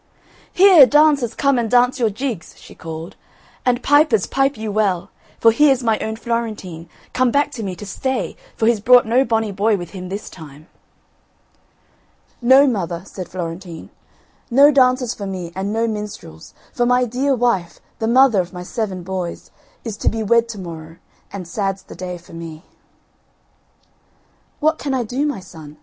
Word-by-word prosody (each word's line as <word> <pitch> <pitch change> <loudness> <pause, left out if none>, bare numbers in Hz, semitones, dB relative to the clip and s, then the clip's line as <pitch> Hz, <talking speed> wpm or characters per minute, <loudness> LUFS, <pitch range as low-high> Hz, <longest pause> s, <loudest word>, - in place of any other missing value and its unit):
"Here, 360 -7 +7
dancers 290 -5 +3
come 275 -3 +2
and 230 -2 -2
dance 250 +2 +3
your 230 -3 +2
jigs," 220 -4 -5
she - - -14
called, 160 +2 -8 0.5
"and 245 -1 0
pipers, 290 - +3
pipe 270 -1 0
you 220 -1 -4
well, 200 -3 0 0.3
for 225 - +6
here's 270 +1 +3
my 225 -2 +1
own 220 0 -3
Florentine, 215 -8 -4 0.2
come 255 -1 +2
back 285 +3 +1
to 245 - -7
me 190 -3 -4
to 205 - -9
stay 260 +6 -3 0.2
for 220 - -1
he's 230 -1 +3
brought 245 +3 +5
no 240 +4 +3
bonny 225 -4 -1
boy 205 +2 +1
with 175 -2 -8
him 185 -2 -8
this 200 +2 -6
time." 155 -3 -12 1.8
"No, 260 +3 +6
mother," 180 -9 -2
said 185 -2 -8
Florentine, 170 -1 -7 0.6
"no 280 +4 +6
dancers 255 -3 +2
for 200 - -7
me 180 -3 -6
and 195 +2 -3
no 225 +1 0
minstrels, 210 - -7 0.2
for 240 - 0
my 250 0 +3
dear 260 +4 0
wife, 200 -9 -1 0.2
the 225 - -1
mother 240 -4 +4
of 175 - -8
my 180 -2 -8
seven, 190 -2 -4
boys, 185 -1 -5 0.3
is 220 -3 -6
to - - +1
be 225 0 -3
wed 235 +2 +2
to 225 - -7
morrow, 165 -3 -9 0.4
and 190 -4 -7
sad's 195 +1 -3
the - - -12
day 180 -1 -6
for 170 0 -17
me." 165 -1 -9 2.0
"What 315 +1 +1
can 275 -2 -2
I 250 - 0
do, 255 +6 -2
my 285 -10 -4
son?" 155 -4 -13
220 Hz, 170 wpm, -19 LUFS, 185-250 Hz, 2.0 s, Here